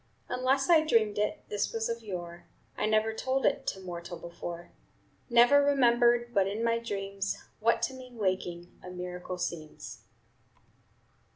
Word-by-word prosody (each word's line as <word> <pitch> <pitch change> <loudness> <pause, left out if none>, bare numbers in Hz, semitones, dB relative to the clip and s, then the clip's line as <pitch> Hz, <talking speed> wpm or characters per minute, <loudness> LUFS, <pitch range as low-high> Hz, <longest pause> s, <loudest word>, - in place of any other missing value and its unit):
"Unless 260 +2 +1
I 330 -3 +6
dreamed 220 -8 +2
it 210 - -1
This 205 -1 -1
was 225 -1 -1
of 230 0 -3
yore; 175 -5 -7 0.3
I - - 0
never 215 +1 +2
told 260 +4 -1
it - - +1
To 190 - -2
mortal 175 -2 -7
before. 170 0 -8 0.6
"Never 245 +4 +6
remembered 240 -3 +3
But 195 -3 +3
in 210 +3 -2
my 230 0 +2
dreams, 200 -3 -3 0.2
What 230 +1 +2
to 265 - 0
me 255 -1 -10
waking 185 -5 -3
A 180 - -8
miracle 180 0 -6
seems." 160 -3 -6
215 Hz, 150 wpm, -30 LUFS, 180-240 Hz, 0.6 s, I